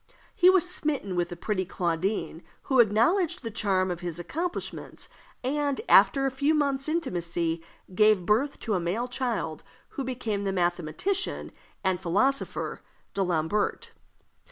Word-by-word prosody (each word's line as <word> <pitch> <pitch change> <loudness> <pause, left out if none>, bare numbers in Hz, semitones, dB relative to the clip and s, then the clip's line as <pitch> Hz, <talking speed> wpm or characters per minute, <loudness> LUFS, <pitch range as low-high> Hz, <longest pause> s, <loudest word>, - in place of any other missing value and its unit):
He 360 - +6
was 370 -1 +4
smitten 295 - -2
with 175 0 0
the 175 - -6
pretty 185 +2 -1
Claudine, 175 -1 -2 0.2
who 265 -2 +2
acknowledged 240 - +3
the 230 - -4
charm 190 -4 +1
of 175 - -4
his 175 -2 -4
accomplishments, 330 - -4 0.3
and, 285 +1 0
after 275 -1 +6
a 270 - +1
few 285 +4 +2
months' 280 -1 0
intimacy, 170 - -1 0.3
gave 210 -2 +4
birth 245 +9 +1
to 220 - -1
a 185 - +2
male 185 +9 -1
child, 240 -11 -2 0.3
who 275 - -4
became 235 -6 -2
the 195 - 0
mathematician 175 - -1 0.3
and 185 -1 +1
philosopher 230 +11 0 0.3
D'Alembert. 180 +1 0
210 Hz, 135 wpm, -27 LUFS, 175-275 Hz, 0.3 s, He